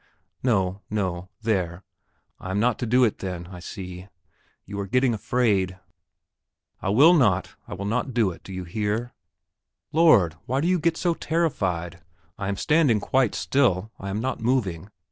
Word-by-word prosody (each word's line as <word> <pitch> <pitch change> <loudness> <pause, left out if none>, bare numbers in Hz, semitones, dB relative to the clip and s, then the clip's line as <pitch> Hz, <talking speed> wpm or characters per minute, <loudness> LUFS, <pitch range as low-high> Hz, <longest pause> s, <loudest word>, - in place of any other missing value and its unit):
No, 100 -5 +1
no; 95 -4 -2
there, 95 -4 -1 0.6
I 95 - -7
am 95 +2 0
not 120 +1 +1
to 120 - -2
do 125 +3 +4
it 110 - +1
then, 90 -2 -5
I 90 - -8
see. 90 0 -8 0.6
You 100 +1 -6
are 100 - -3
getting 125 +3 +2
afraid. 100 -5 +1 1.0
I - - -1
will 140 - +7
not, 105 - +2
I - - -6
will 100 +2 -5
not 120 +6 -1
do 115 -5 +2
it; 85 - -12
do - - -11
you 95 0 -5
hear? 110 +6 -2 0.8
Lord, 120 - +5
why 130 +3 0
do 160 - 0
you 180 0 +2
get 165 +1 +1
so 175 -2 +1
terrified. 95 - -1 0.4
I 95 - -3
am 100 0 -2
standing 150 -7 +3
quite 125 +2 +1
still; 110 -7 +1
I 100 - -5
am 100 +2 -2
not 130 +1 -3
moving. 105 -7 0
105 Hz, 170 wpm, -25 LUFS, 95-125 Hz, 1.0 s, will